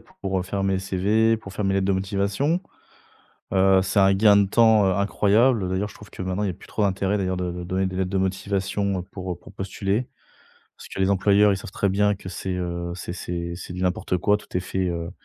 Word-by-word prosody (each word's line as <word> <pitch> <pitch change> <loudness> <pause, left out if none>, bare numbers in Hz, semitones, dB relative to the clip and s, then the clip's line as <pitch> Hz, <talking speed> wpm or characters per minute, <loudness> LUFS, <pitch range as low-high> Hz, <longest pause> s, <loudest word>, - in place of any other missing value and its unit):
pour, 95 -1 -5
heu, - - -2
faire 95 +1 -3
mes 95 -1 +1
CV, 105 +4 +2
pour 95 -3 -11
faire 100 0 -3
mes 95 0 +1
lettres 95 0 +1
de 100 - +2
motivation. 100 - 0 0.9
Heu, 95 0 +5
c'est 100 +2 +1
un 95 0 +5
gain 100 +1 +5
de 100 -1 +4
temps, 110 -2 +5
heu, 95 - +2
incroyable. 105 +2 +2
D'ailleurs, 95 +3 -1
je - - -14
trouve 105 - -14
que - - -7
maintenant, 95 +2 -2
il 100 - 0
y - - 0
a 90 - -5
plus - - -16
trop 105 - -3
d'intérêt 100 +1 +1
d'ailleurs 95 -1 -1
de 90 -1 -2
de 90 0 -6
donner 95 +2 -1
des 95 - -5
lettres 95 0 -1
de 95 - 0
motivation 95 0 -1
pour 90 -2 -5
pour 100 - -15
postuler. 100 +4 -2 0.7
Parce - - -12
que - - -6
les 95 +1 +3
employeurs, 100 +1 +4
ils - - 0
savent 95 - -9
très 100 - 0
bien 105 +2 +2
que 95 -1 -10
c'est, 95 0 -4
heu, 85 -1 -3
c'est 85 -1 -6
c'est 85 -1 -4
c'est 90 - -8
du 90 +1 -5
n'importe 90 0 0
quoi. 105 +4 +3
Tout 105 - -8
est - - +1
fait, 95 0 -2
heu, 85 -1 -3
95 Hz, 245 wpm, -24 LUFS, 95-100 Hz, 0.9 s, Heu